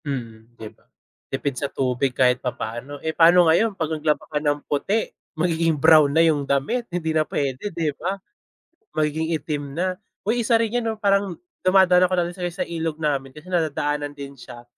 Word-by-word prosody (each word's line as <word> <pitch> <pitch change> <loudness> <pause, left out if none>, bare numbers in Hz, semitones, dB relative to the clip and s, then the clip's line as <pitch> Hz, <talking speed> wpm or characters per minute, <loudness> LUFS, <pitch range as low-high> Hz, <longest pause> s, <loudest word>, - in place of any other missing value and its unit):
Mm, 120 -4 -6
'di 110 - -8
ba? - - -32 0.5
Tipid 135 0 -2
sa 140 +2 -3
tubig 130 0 0
kahit 125 -1 +3
papaano. 125 +3 -5
Eh, 160 - -1
paano 175 +1 +6
ngayon 195 +5 +3
pag 160 - -1
naglaba 155 0 0
ka 150 - -2
ng 145 -1 0
puti, 200 +10 0 0.3
magiging 165 -1 +1
brown 155 -2 +6
na 160 - +2
yung 150 -3 +2
damit. 140 - -1
Hindi 165 -2 -2
na 155 - +4
pwede, 140 +7 -2
'di 160 -4 -1
ba? 185 +6 -3 0.8
Magiging 155 +1 0
itim 145 -2 -4
na. 185 +1 0 0.3
Uy, 235 +4 +1
isa 230 - +3
rin 225 -1 -1
'yan, 240 - -2
'no, 225 -1 -1
parang 200 -2 +2 0.3
dumadaan 185 -1 +5
ako - - -2
non 175 0 0
sa - - -8
i - - -1
sa - - -2
ilog 165 -2 -3
namin 140 -3 -1
kasi 150 - -12
nadadaanan 150 -4 -1
din 140 -1 -8
siya. 120 -1 -11
155 Hz, 190 wpm, -23 LUFS, 140-175 Hz, 0.8 s, paano